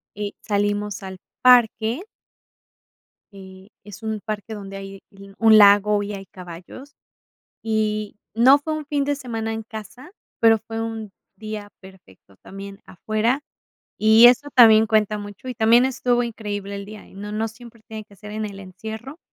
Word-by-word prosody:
eh, 205 0 -4
salimos 205 0 -1
al 190 -1 -8 0.2
parque 240 +1 +4 1.3
Eh, 190 0 -13 0.2
es 210 +2 -12
un 220 -1 -3
parque 215 +1 -6
donde 195 -2 -8
hay 195 0 -9
l 195 0 -15
un 220 -1 +6
lago 205 0 +6
y 205 - -5
hay 195 -1 -8
caballos, 185 +10 -12 0.7
y 215 -2 -2 0.2
no 260 +5 +6
fue 310 +2 -5
un 305 -2 -4
fin 290 -1 -1
de 285 0 -1
semana 225 -4 -4
en 225 0 -5
casa, 230 - -10 0.3
pero 225 -1 +5
fue 225 +1 -7
un 225 -2 -5 0.3
día 215 -1 -7
perfecto 180 - -18
también 195 0 -10
afuera. 215 +7 -1 0.6
Y 220 +2 +6
eso 265 +4 +3
también 220 -3 +7
cuenta 215 -1 +1
mucho, 205 +4 -10
y 250 - -5
también 230 +3 +4
estuvo 245 -2 0
increíble 205 -3 -5
el 200 0 -7
día, 215 0 -12
y - - -20
no 205 +1 -7
no 220 +1 -2
siempre 230 0 -14
tiene 220 -1 -7
que 205 -1 -20
ser 210 +1 -11
en 215 0 -3
el 200 -1 -8
encierro, 220 - -9
215 Hz, 165 wpm, -22 LUFS, 200-225 Hz, 1.3 s, también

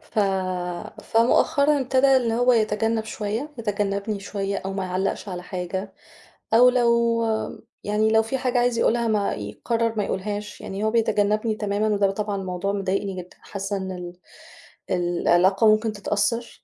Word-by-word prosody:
ف - - -7 0.8
فمؤخرًا 280 +5 +3
ابتدا 265 +1 +4
إن 235 -3 +1
هو 245 +2 +3
يتجنّب 220 0 +1
شوية، 220 +7 -4
يتجنّبني 205 -1 -2
شوية 200 0 -3
أو 195 0 -4
ما 195 -1 -3
يعلّقش 185 +2 -2
على 180 -1 -5
حاجة، 185 +1 -5 0.6
أو 245 +2 +7
لو 235 -2 +2 0.6
يعني 210 +1 +1
لو 220 0 +5
في 265 +4 -2
حاجة 250 -1 0
عايز 240 -1 +1
يقولها 235 0 +2
ما 210 -2 +1
يقرّر 230 - -2
ما 205 - +1
يقولهاش، 205 +2 -4
يعني 195 +2 -5
هو 220 - +1
بيتجنّبني 215 -1 +1
تمامًا 210 0 -1
وده 200 -2 +2
طبعًا 205 0 -3
موضوع 185 +1 -2
مضايقني 195 0 -1
جدًا، 180 - -17
حاسّة 200 0 -4
إن 190 0 -4
ال 180 -1 -7 0.8
العلاقة 180 +3 +3
ممكن 215 +1 +3
تتأثّر، 210 +4 -2
210 Hz, 150 wpm, -24 LUFS, 195-230 Hz, 0.8 s, أو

